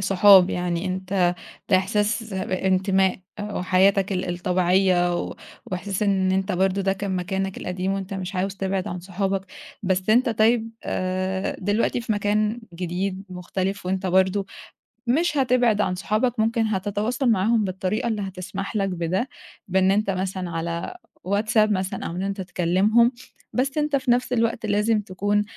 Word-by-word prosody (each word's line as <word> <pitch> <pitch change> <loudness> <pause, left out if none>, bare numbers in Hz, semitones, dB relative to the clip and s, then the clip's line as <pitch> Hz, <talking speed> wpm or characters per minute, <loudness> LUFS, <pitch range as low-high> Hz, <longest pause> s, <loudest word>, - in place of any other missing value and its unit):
صحاب، 195 -1 +6
يعني 175 0 -2
أنت 185 -1 0 0.4
ده 185 - +7
إحساس 210 +2 0
بانتماء 190 0 +1 0.2
وحياتك 195 0 +2
ال 180 -1 -2
الطبيعية 180 0 +2
و - - -6 0.3
وإحساس 190 +2 -3
إن 190 -2 +2
أنت 190 +1 0
برضه 190 +2 +1
ده 195 0 +2
كان 195 -1 -3
مكانك 190 +1 -2
القديم 185 +1 -2
وأنت 195 0 -4
مش 190 0 -5
عاوز 195 +1 -1
تبعد 190 -1 -2
عن 180 0 -5
صحابك، 195 +1 -2 0.4
بس 190 +1 0
أنت 245 +3 +4
طيب 225 +1 +2
آآ، 185 +1 -2
دلوقتي 205 +5 0
في 230 -2 -1
مكان 210 +2 0
جديد 185 +2 -3
مختلف 185 +1 -4
وأنت 190 +1 -1
برضه 190 +2 +2 0.6
مش 300 +4 +2
هتبعد 245 -5 +3
عن 185 -2 0
صحابك 220 +5 0
ممكن 225 +1 +2
هتتواصل 215 +5 -1
معاهم 220 +3 +2
بالطريقة 190 +3 -2
اللي 215 -3 -1
هتسمح 195 +2 -5
لك 195 -2 +1
بده، 180 +7 -1 0.4
بإن 190 0 +3
أنت 205 0 +1
مثلًا 185 -1 -2
على 170 - -4 0.3
WhatsApp 215 +1 +2
مثلًا 190 0 -2
أو - - -3
إن 185 - -2
أنت 195 0 -3
تكلِّمهم، 190 +7 +3 0.4
بس 270 +3 0
أنت 300 -1 +1
في 260 -3 +1
نَفْس 250 +1 +1
الوقت 230 0 0
لازم 210 +1 +2
تكون 205 +2 0
195 Hz, 150 wpm, -24 LUFS, 185-215 Hz, 0.6 s, ده